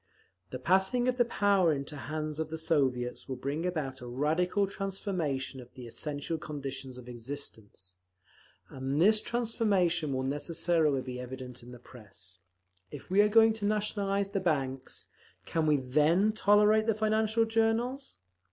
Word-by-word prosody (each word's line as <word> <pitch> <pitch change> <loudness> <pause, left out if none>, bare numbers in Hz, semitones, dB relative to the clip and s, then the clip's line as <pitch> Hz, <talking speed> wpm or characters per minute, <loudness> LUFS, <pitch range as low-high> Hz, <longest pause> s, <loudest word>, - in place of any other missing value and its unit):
The 130 - -5
passing 190 - +2
of 250 0 +1
the 240 - +4
power 200 -6 +3
into 140 +1 -3
the 145 - -7
hands 155 0 -4
of 160 -1 -2
the 160 - -4
Soviets 135 -7 0
will 130 - -2
bring 140 +7 -2
about 140 -7 -3
a 125 - -7
radical 160 - +1
transformation 185 -9 -3
of 125 0 -15
the 125 -2 -9
essential 145 +6 -3
conditions 135 -4 -6
of 125 -1 -11
existence, 115 -7 -8 0.7
and 135 +2 -3
this 215 +5 +5
transformation 200 - 0
will 130 -1 -1
necessarily 155 0 +1
be 125 -1 -6
evident 125 0 -7
in 120 +1 -12
the 125 - -10
Press…. 100 -7 -11 0.5
If 145 +5 -10
we 195 +2 +6
are 210 - +4
going 225 +1 +6
to 220 -2 -4
nationalise 200 -1 0
the 200 0 -1
banks, 135 -7 -2 0.4
can 160 -1 0
we 150 -1 +4
then 150 +10 +3
tolerate 210 +1 +4
the 225 - +3
financial 220 +1 +2
journals? 225 +4 0
160 Hz, 155 wpm, -30 LUFS, 130-205 Hz, 0.7 s, we